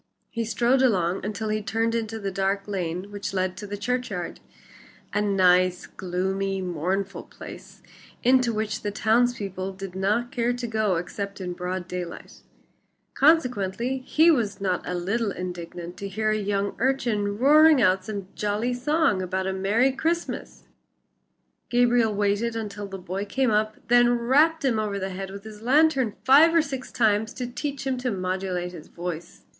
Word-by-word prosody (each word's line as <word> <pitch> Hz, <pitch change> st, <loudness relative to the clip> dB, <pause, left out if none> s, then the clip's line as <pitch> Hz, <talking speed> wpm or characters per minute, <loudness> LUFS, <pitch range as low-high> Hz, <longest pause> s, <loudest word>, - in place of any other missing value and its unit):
He 230 Hz, -2 st, -2 dB
strode 240 Hz, +4 st, +2 dB
along 190 Hz, -8 st, +2 dB
until 215 Hz, +2 st, -3 dB
he 215 Hz, 0 st, 0 dB
turned 225 Hz, +2 st, 0 dB
into 225 Hz, -1 st, -2 dB
the 200 Hz, -2 st, -3 dB
dark 195 Hz, +1 st, -1 dB
lane 185 Hz, 0 st, -3 dB
which 205 Hz, -1 st, -5 dB
led 185 Hz, 0 st, 0 dB
to 205 Hz, -, -7 dB
the 205 Hz, +1 st, -5 dB
churchyard 210 Hz, -5 st, -3 dB, 0.7 s
a 210 Hz, -, +1 dB
nice, 185 Hz, -3 st, +3 dB
gloomy, 190 Hz, +1 st, -2 dB
mournful 185 Hz, +3 st, -2 dB
place -, -, -12 dB, 0.4 s
into 250 Hz, -1 st, +4 dB
which 215 Hz, -1 st, -2 dB
the 205 Hz, -, -2 dB
towns 230 Hz, +4 st, +2 dB
people 190 Hz, -2 st, -4 dB
did 190 Hz, -1 st, -8 dB
not 210 Hz, +6 st, 0 dB
care 240 Hz, 0 st, 0 dB
to 245 Hz, 0 st, -4 dB
go 220 Hz, -4 st, 0 dB
except 200 Hz, +4 st, -4 dB
in 180 Hz, -2 st, -4 dB
broad 180 Hz, 0 st, -4 dB
daylight, 180 Hz, -2 st, -7 dB, 0.7 s
consequently 250 Hz, -, +2 dB
he 315 Hz, +6 st, +4 dB
was 230 Hz, -9 st, 0 dB
not 185 Hz, -3 st, 0 dB
a 180 Hz, -, -2 dB
little 200 Hz, +6 st, -1 dB
indignant 175 Hz, -1 st, -6 dB
to 200 Hz, -, -5 dB
hear 215 Hz, +2 st, 0 dB
a -, -, +2 dB
young 200 Hz, -1 st, -1 dB
urchin 230 Hz, -6 st, 0 dB
roaring 300 Hz, +4 st, +6 dB
out 190 Hz, -4 st, +3 dB
some 200 Hz, -1 st, -5 dB
jolly 210 Hz, +4 st, -1 dB
song 275 Hz, -, +1 dB
about 185 Hz, +1 st, -2 dB
a 190 Hz, -, -1 dB
Merry 210 Hz, +8 st, +2 dB
Christmas. 330 Hz, +5 st, -3 dB, 1.1 s
Gabriel 240 Hz, -2 st, +3 dB
waited 205 Hz, +3 st, 0 dB
until 205 Hz, -2 st, -5 dB
the 195 Hz, 0 st, -7 dB
boy 185 Hz, +2 st, -4 dB
came 245 Hz, +4 st, 0 dB
up, 215 Hz, 0 st, +1 dB
then 240 Hz, 0 st, +5 dB
rapped 290 Hz, +6 st, +3 dB
him 235 Hz, -5 st, +2 dB
over 210 Hz, -2 st, -2 dB
the 190 Hz, 0 st, -3 dB
head 190 Hz, +1 st, -5 dB
with 200 Hz, +1 st, -9 dB
his 215 Hz, -1 st, -11 dB
lantern 265 Hz, -3 st, +3 dB
five 300 Hz, +6 st, +7 dB
or 330 Hz, -, +6 dB
six 265 Hz, -3 st, -6 dB
times 220 Hz, -1 st, +1 dB
to 250 Hz, -, -3 dB
teach 275 Hz, +3 st, -4 dB
him 260 Hz, -2 st, -1 dB
to 250 Hz, 0 st, -1 dB
modulate 185 Hz, -2 st, -2 dB
his 165 Hz, -4 st, -11 dB
voice. 175 Hz, -1 st, -7 dB
210 Hz, 165 wpm, -25 LUFS, 190-245 Hz, 1.1 s, five